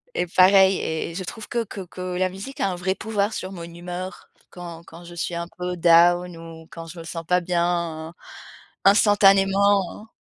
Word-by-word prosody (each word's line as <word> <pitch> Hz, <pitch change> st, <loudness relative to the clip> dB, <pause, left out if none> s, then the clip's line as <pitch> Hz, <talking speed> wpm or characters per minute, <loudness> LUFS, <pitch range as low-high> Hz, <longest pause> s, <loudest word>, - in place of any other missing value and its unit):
et 180 Hz, -, -1 dB
pareil 190 Hz, +2 st, +5 dB
et 160 Hz, +1 st, -3 dB
et -, -, -11 dB
je 185 Hz, -, -4 dB
trouve 215 Hz, +4 st, -8 dB
que 235 Hz, -1 st, -1 dB
que 200 Hz, -2 st, -8 dB
que 180 Hz, 0 st, -10 dB, 0.2 s
la 185 Hz, 0 st, +1 dB
musique 205 Hz, +10 st, -9 dB
a 195 Hz, -, +1 dB
un 180 Hz, -, -3 dB
vrai 190 Hz, +2 st, -2 dB
pouvoir 210 Hz, 0 st, -2 dB
sur 185 Hz, -, -5 dB
mon 175 Hz, -3 st, -8 dB
humeur, 175 Hz, +2 st, -8 dB, 0.2 s
quand 170 Hz, -2 st, -10 dB
quand 170 Hz, +2 st, -13 dB
je 175 Hz, -, -11 dB
suis 170 Hz, 0 st, -3 dB
un 170 Hz, 0 st, -4 dB
peu 180 Hz, 0 st, -4 dB
down 175 Hz, +1 st, +4 dB
ou 165 Hz, -1 st, -11 dB
quand 165 Hz, 0 st, -8 dB
je 170 Hz, +1 st, -10 dB
me -, -, -8 dB
sens 165 Hz, 0 st, -6 dB
pas 180 Hz, +2 st, +2 dB
bien. 170 Hz, -2 st, -2 dB, 0.7 s
Instantanément. 200 Hz, 0 st, +4 dB
180 Hz, 195 wpm, -23 LUFS, 170-195 Hz, 0.7 s, pareil